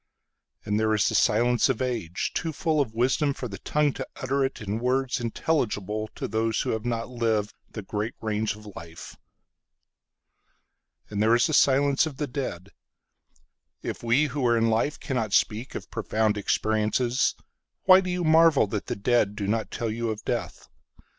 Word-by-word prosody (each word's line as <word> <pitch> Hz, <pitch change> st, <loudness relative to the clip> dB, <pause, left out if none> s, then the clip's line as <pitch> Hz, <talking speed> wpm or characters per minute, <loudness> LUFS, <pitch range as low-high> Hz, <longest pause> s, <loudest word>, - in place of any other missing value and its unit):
And 105 Hz, +1 st, 0 dB
there 110 Hz, 0 st, +2 dB
is 105 Hz, -, +2 dB
the -, -, 0 dB
silence 120 Hz, +4 st, +3 dB
of 130 Hz, -, 0 dB
age, 115 Hz, -9 st, -2 dB
Too 165 Hz, -, -2 dB
full 155 Hz, 0 st, +1 dB
of 110 Hz, -5 st, -3 dB
wisdom 135 Hz, +4 st, +1 dB
for 125 Hz, -, -5 dB
the 100 Hz, -3 st, -8 dB
tongue 150 Hz, -2 st, +1 dB
to -, -, -6 dB
utter 135 Hz, +2 st, -2 dB
itIn 110 Hz, -6 st, -2 dB
words 130 Hz, +2 st, 0 dB
intelligible 110 Hz, -, -1 dB
to -, -, -4 dB
those 110 Hz, 0 st, 0 dB
who -, -, -1 dB
have 110 Hz, +1 st, -3 dB
not 115 Hz, -1 st, -2 dB
livedThe 110 Hz, -3 st, -3 dB
great 105 Hz, +3 st, -3 dB
range 110 Hz, -1 st, -1 dB
of 105 Hz, 0 st, -14 dB
life. 85 Hz, 0 st, -10 dB, 2.0 s
And 105 Hz, 0 st, -1 dB
there 110 Hz, +2 st, +5 dB
is 120 Hz, -, +3 dB
the 160 Hz, -, -1 dB
silence 140 Hz, +1 st, +4 dB
of 145 Hz, -4 st, -8 dB
the 150 Hz, -, -1 dB
dead. 120 Hz, -, -5 dB, 1.1 s
If -, -, -4 dB
we 120 Hz, +5 st, +3 dB
who 140 Hz, -1 st, -3 dB
are 120 Hz, 0 st, +3 dB
in 115 Hz, 0 st, +2 dB
life 115 Hz, +7 st, 0 dB
cannot 115 Hz, -7 st, -2 dB
speakOf 115 Hz, +4 st, 0 dB
profound 110 Hz, -1 st, 0 dB
experiences, 110 Hz, +4 st, +1 dB, 0.5 s
Why 185 Hz, 0 st, +7 dB
do 185 Hz, -, -4 dB
you 180 Hz, 0 st, -1 dB
marvel 160 Hz, -4 st, +5 dB
that 105 Hz, 0 st, -4 dB
the -, -, -2 dB
deadDo 105 Hz, -2 st, +1 dB
not 110 Hz, +1 st, -1 dB
tell 115 Hz, -2 st, -3 dB
you 115 Hz, +1 st, -2 dB
of 110 Hz, -1 st, -5 dB
death? -, -, -3 dB
115 Hz, 165 wpm, -26 LUFS, 110-135 Hz, 2.0 s, Why